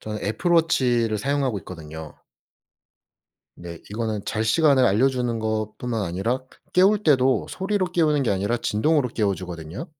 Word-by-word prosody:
저는 105 -1 -6
애플 110 - -1
워치를 125 -10 +2
사용하고 135 -2 -1
있거든요. 80 -3 -9 1.4
네. 85 -1 -9
이거는 110 -1 -3
잘 110 0 -2
시간을 140 +2 +4
알려주는 125 +3 +1
것뿐만 110 +1 -3
아니라 100 +8 -2 0.3
깨울 195 +3 +4
때도 130 -4 +3
소리로 195 0 -1
깨우는 150 -5 +2
게 - - +1
아니라 100 +5 0
진동으로 125 +5 +1
깨워주거든요. 95 - -3
115 Hz, 340 characters per minute, -23 LUFS, 100-140 Hz, 1.4 s, 시간을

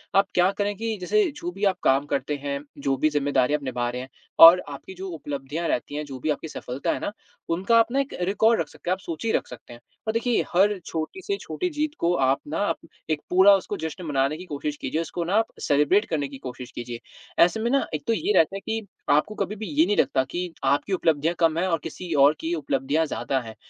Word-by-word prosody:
आप 195 +1 +5
क्या 180 +1 +4
करें 205 0 0
कि 225 +1 -3
जैसे, 410 - +2
जो 340 +5 -6
भी 210 - -8
आप 190 -2 +2
काम 135 +2 +3
करते 140 0 -1
हैं, 140 -1 -2 0.2
जो 140 -1 0
भी 155 - +2
ज़िम्मेदारी 145 -2 +1
आप 150 -1 0
निभा 125 -2 -2
रहे 125 +1 -4
हैं 130 - -9 0.4
और 170 +2 +10
आपकी 145 +6 -9
जो 190 +1 -7
उपलब्धियाँ 145 0 -4
रहती 145 +1 -2
हैं, 150 - -2
जो 135 -2 -8
भी 155 - -2
आपकी 150 +2 -2
सफलता 130 -3 -3
हैं - - -4
ना - - -2 0.4
उनका 190 +7 +2
आप 230 - +2
ना 270 - +1
एक 275 0 -2
रिकॉर्ड 210 +5 +3
रख 160 - -4
सकते 175 - -8
हैं, - - +4
आप 185 - -4
सूची 175 +5 -3
रख - - 0
सकते 120 -1 -11
हैं 120 - -12 0.3
और 220 - +1
देखिए, 230 +1 +1
हर 200 +3 +4
छोटी 160 - -4
से 400 +1 -2
छोटी 365 - -3
जीत 305 -2 -1
को 170 +1 +2
आप 135 -3 +2
ना 165 +4 0 0.4
एक 155 -1 0
पूरा 190 +2 +7
उसको 200 +1 -3
जश्न 160 +3 -5
मनाने 140 0 0
की 180 - -9
कोशिश 150 -2 -4
कीजिए, 160 - -2
उसको 170 +1 -4
ना 180 +4 -1
आप 225 +1 +3
सेलिब्रेट 150 +9 +3
करने 150 -4 -1
की 135 0 -10
कोशिश 125 -1 -8
कीजिए। 120 -1 -6 0.4
ऐसे 180 +6 +2
में 230 +2 0
ना 275 0 +2
एक 150 -2 -3
तो - - +3
ये 365 - 0
रहता 165 +4 +3
है - - -3
कि 220 -1 -3 0.2
आपको 150 +9 +2
कभी 200 +1 -2
भी 215 +1 -6
ये 155 0 +3
नहीं 205 +2 0
लगता 130 - +2
कि 175 -1 -3
आपकी 140 +8 +1
उपलब्धियाँ 165 -2 +1
कम 165 -2 +3
हैं 185 - +1
और 165 -3 +1
किसी 170 +1 -5
और 140 0 +6
की 165 +2 -2
उपलब्धियाँ 145 +1 0
ज़्यादा 135 -2 -2
हैं 110 -3 -9
165 Hz, 245 wpm, -25 LUFS, 140-200 Hz, 0.4 s, और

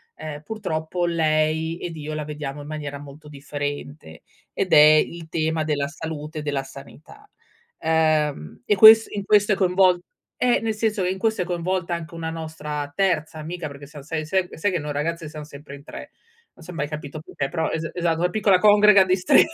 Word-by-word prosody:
ehm, 150 -2 -7
purtroppo 175 -4 -3
lei 160 -1 0
ed 170 -2 -6
io 155 0 -6
la 155 0 -3
vediamo 150 -1 -6
in 145 - -10
maniera 145 -2 -6
molto 145 +1 -13
differente. 145 - -6 0.3
Ed 190 - -1
è - - +8
il 155 +2 +5
tema 160 0 -1
della 145 -2 -1
salute 155 +1 -7
e - - -4
della 145 -2 -2
sanità, 150 - -14 0.5
ehm, 155 - 0
e 205 - +2
ques 220 +2 +9
in 200 - -4
questo 210 0 +4
è - - +1
coinvol 185 -1 +3 0.4
eh, 250 -1 +3
nel 225 -1 -1
senso 215 -2 -1
e 180 - 0
in 190 - -4
questo 220 0 0
è - - -1
coinvolta 175 0 -2
anche 170 -1 -6
una 165 -1 -4
nostra 150 -3 -5
terza 165 -5 0
amica 165 +1 -5
perché 140 0 -11
sai 145 -1 -12
se 155 +1 -4
se 190 +5 -1
ehm, 180 -1 -5
se 200 +6 0
che 180 - -1
no 150 0 -5
ragazze 165 +3 -3
siamo 155 -1 -9
sempre 140 -1 -11
in 140 - -14
3, - - -10 0.4
non 170 - -17
s'è 180 - -9
mai 150 -3 -3
capito 150 -1 -7
perché, 140 -3 -4
però 160 -2 -1
es 160 0 -3
esatto, 170 -2 0
una 180 +1 +1
piccola 200 -1 +3
congrega 210 -1 +6
di 185 0 +2
stre 180 - +5
160 Hz, 205 wpm, -23 LUFS, 150-180 Hz, 0.5 s, ques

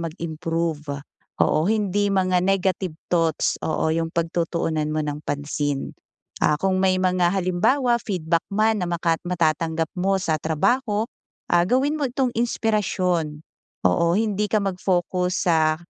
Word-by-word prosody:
mag-improve. 160 -3 -3 0.3
Oo, 155 +4 +2
hindi 205 -2 +1
mga 185 -2 +2
negative 185 -2 0 0.2
thoughts, 165 -3 +1
oo, 160 0 0
'yong 165 0 0
pagtutuunan 165 -2 -1
mo 155 0 -1
ng 150 0 -4
pansin. 145 -1 -3 0.5
Ah, 150 - +3
kung 185 +3 0
may 185 -1 +3
mga 185 -1 +2
halimbawa 200 +8 +2
feedback 170 -5 0
man 215 +1 +2
na 180 - -1
makat 170 -1 0
matatanggap 165 -1 0
mo 195 +2 +1
sa 160 -5 -1
trabaho, 210 - +1 0.5
ah, 175 0 +4
gawin 285 +6 +1
mo 280 - +1
itong 250 0 -1
inspirasyon. 185 -9 0 0.4
Oo, 170 +1 +3
hindi 210 -1 0
ka 215 -2 +1
mag-focus 180 -1 0
sa, 160 -2 +3
180 Hz, 130 wpm, -23 LUFS, 160-195 Hz, 0.5 s, ah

